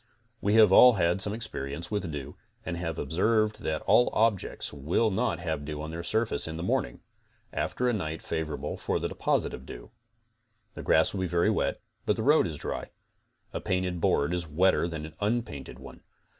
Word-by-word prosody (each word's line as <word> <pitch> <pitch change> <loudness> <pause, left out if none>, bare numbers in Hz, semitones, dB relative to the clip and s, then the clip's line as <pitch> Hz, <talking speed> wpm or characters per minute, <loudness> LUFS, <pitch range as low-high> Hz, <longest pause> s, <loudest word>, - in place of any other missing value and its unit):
We 105 +2 +2
have 110 -3 +7
all' 125 +5 +9
had 90 -1 +1
some 100 - +3
experience 85 -8 -5
with 100 -6 -2
dew 75 -1 -6 0.3
and 90 - -3
have 85 -2 -4
ob 70 - -5
served 110 +5 +2
that 80 0 -2
all 110 +5 +4
objects 110 -8 0
will 80 +10 +1
not 95 -2 0
have 80 -4 -3
dew 75 0 -5
on 80 +1 -5
their 85 +1 -5
surfaces 110 -3 +1
in 80 0 -5
the 85 - -4
morning, 60 -8 -1 0.5
after 125 - -1
a 120 - +2
night 80 -6 -3
favorable 80 -2 -3
to - - -1
the - - -2
deposit - - 0
of 65 +1 -9
dew. - - -10 0.8
The - - -7
grass - - +3
will 95 - -2
be 95 - 0
very 85 0 +2
wet, - - -1 0.3
but 105 - +3
the 110 - -3
road 145 - +4
is 80 -3 -5
dry. - - -5 0.6
A - - -3
painted 90 -2 -1
board 70 +4 +2
is 85 -2 -2
wetter 85 +3 +2
than 80 -2 -5
an 80 - -10
unpainted 105 - -2
one. - - -12
85 Hz, 200 wpm, -28 LUFS, 80-105 Hz, 0.8 s, all